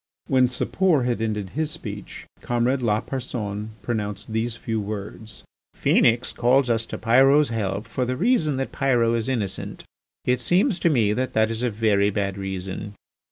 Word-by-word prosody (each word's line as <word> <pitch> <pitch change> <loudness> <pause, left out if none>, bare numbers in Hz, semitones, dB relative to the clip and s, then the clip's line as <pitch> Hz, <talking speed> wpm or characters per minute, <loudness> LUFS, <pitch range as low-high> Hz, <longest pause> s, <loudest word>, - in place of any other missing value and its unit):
When 130 -1 +3
Sapor 155 +4 +1
had 120 -2 -1
ended 105 -4 -2
his 155 +1 -1
speech - - -8 0.2
comrade 120 +2 0
Lapersonne 110 -2 -2
pronounced 105 -2 -3
these 115 +1 -1
few 115 -1 -3
words: 105 +1 -7 0.4
"Phœnix 120 +1 +3
calls 125 +1 +3
us 115 0 0
to - - -5
Pyrot's 135 +6 +4
help 105 -3 -2
for 130 - -2
the 125 +1 -2
reason 165 - +2
that 135 - -3
Pyrot 120 -4 +2
is 115 +2 -2
innocent. 110 -7 -3 0.4
It 125 0 +2
seems 180 - +2
to 170 - +3
me 115 -8 +2
that 130 +2 -2
that 110 0 +2
is 115 +1 -3
a 125 - +1
very 105 -2 +2
bad 100 -1 -2
reason. 95 +1 -5
115 Hz, 160 wpm, -24 LUFS, 105-130 Hz, 0.4 s, Pyrot's